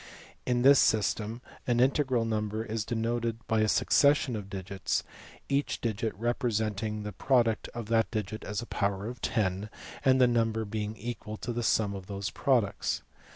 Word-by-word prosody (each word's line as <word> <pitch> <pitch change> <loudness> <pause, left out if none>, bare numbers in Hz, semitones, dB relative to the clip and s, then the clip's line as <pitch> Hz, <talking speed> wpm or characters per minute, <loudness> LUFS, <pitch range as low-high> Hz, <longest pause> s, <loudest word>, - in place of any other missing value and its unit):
In 125 -1 +2
this 140 +1 +8
system 110 +2 +1 0.3
an 120 -1 +2
integral 130 -2 +2
number 110 0 -2
is 110 -1 -3
denoted 115 0 -1
by 110 - +2
a 110 - +3
succession 140 +2 +3
of 100 -2 -6
digits, 95 0 -2 0.4
each 140 +1 0
digit 110 -2 -2
representing 110 -3 -1
the 105 - -4
product 115 +1 +2
of 120 -2 -4
that 115 -1 +3
digit 110 -1 -4
and 105 0 -3
a - - -7
power 100 -3 -1
of 125 +1 -7
ten, 100 0 0 0.3
and 130 -1 +5
the 125 - +7
number 115 -2 +1
being 105 +1 -4
equal 110 -2 -6
to 120 - -4
the 120 - -2
sum 110 -3 +2
of 95 -2 -7
these 100 -1 -4
pro 135 -4 +3
ducts. 100 -2 -3
110 Hz, 170 wpm, -29 LUFS, 105-120 Hz, 0.4 s, this